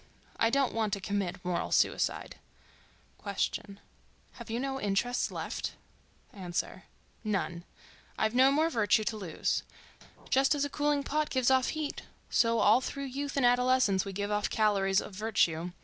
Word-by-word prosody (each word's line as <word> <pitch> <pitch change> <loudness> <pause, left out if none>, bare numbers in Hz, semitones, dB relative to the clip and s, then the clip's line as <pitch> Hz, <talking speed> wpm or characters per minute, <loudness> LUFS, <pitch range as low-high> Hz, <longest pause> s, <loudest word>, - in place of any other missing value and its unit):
I 225 - +4
don't 275 +1 +1
want 220 -2 -1
to 200 - -1
commit 190 -2 -3
moral 180 -1 -2
suicide. - - 0 0.9
Q.—Have 200 +3 -6
you 230 +2 -2
no 270 0 -3
interests 210 +5 0
left? - - -4 0.6
A.—None. 185 0 -5 0.5
I've 220 +1 +1
no 260 +2 +5
more 310 +3 +2
virtue 215 -2 +2
to 220 - -2
lose. 190 -7 -2 0.7
Just 270 +2 +4
as 285 0 0
a 285 - -5
cooling 290 -1 +1
pot 305 +2 -1
gives 260 -1 +2
off 260 -1 +3
heat, 310 -2 -3 0.3
so 230 0 +3
all 215 +3 +5
through 280 +2 -5
youth 285 +1 -4
and 270 - +3
adolescence 245 -5 +3
we 195 - -6
give 205 +2 -3
off 210 0 0
calories 195 -3 +2
of 210 - -9
virtue. 180 -5 0
225 Hz, 150 wpm, -30 LUFS, 200-265 Hz, 0.9 s, no